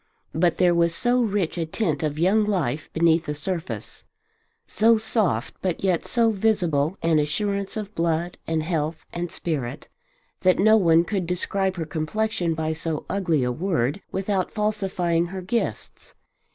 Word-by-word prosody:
But 170 +1 +2
there 180 -1 +4
was 170 -1 +2
so 245 +3 +2
rich 200 -6 -1
a 165 - 0
tint 160 -5 -1
of 150 -2 -2
young 190 +7 +3
life 165 -9 -1
beneath 165 0 +2
the 150 - -2
surface, 170 +3 -4 0.6
so 225 +1 +4
soft 215 - 0
but 185 -1 -2
yet 185 -4 +1
so 230 -2 +3
visible 185 -6 +1
an 165 -2 +3
assurance 200 +8 -1
of 210 -1 -5
blood 170 0 -1
and 160 -1 0
health 160 -1 -2
and 175 0 -3
spirit, 145 -5 -4 0.5
that 185 -1 +3
no 215 +3 +5
one 170 -5 +5
could 185 -2 -2
describe 190 +2 -1
her 165 -3 -3
complexion 170 +2 -1
by 160 0 -1
so 160 -1 -4
ugly 170 -8 +1
a 125 - 0
word 165 +1 -1
without 190 -1 -1
falsifying 190 -5 0
her 190 +1 -6
gifts. 230 +6 -4
175 Hz, 155 wpm, -24 LUFS, 160-200 Hz, 0.6 s, no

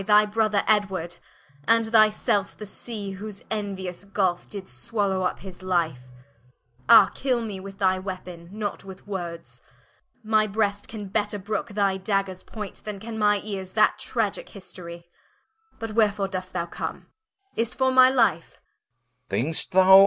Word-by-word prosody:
Thy 210 0 +7
Brother 215 -1 +1
Edward, 190 -5 +1 0.5
and 230 0 +5
thy 220 -1 +6
Selfe, 205 -1 0
the 210 - -7
Sea 205 -1 -4
Whose 200 +1 -7
enuious 195 -4 -3
Gulfe 190 -3 0
did 195 -2 -6
swallow 200 -5 -1
vp - - -17
his 185 -1 -10
life: 165 -9 0 0.8
Ah, 205 -4 +9
kill 255 -3 0
me 205 -4 -5
with 195 +1 -9
thy 190 -2 +2
Weapon, 180 -3 -7
not 210 0 -4
with 190 -1 -11
words, 175 -4 -6 0.6
My 215 0 +3
brest 205 -1 0
can 210 -3 -7
better 210 +1 0
brooke 215 +4 -3
thy 200 -2 +2
Daggers 195 -1 -1
point, 210 -3 -8
Then 210 -2 -5
can 220 +1 -6
my 205 -1 +3
eares 190 -3 -5
that 215 -1 +3
Tragicke 225 -5 -2
History. 170 -3 -10 0.7
But 225 -1 -5
wherefore 205 -3 +2
dost 185 -1 -4
thou 170 -2 -1
come? 175 - -6 0.5
Is't 230 +2 -1
for 260 0 +2
my 255 0 +8
Life? 230 -11 +1
200 Hz, 145 wpm, -25 LUFS, 185-215 Hz, 0.8 s, Ah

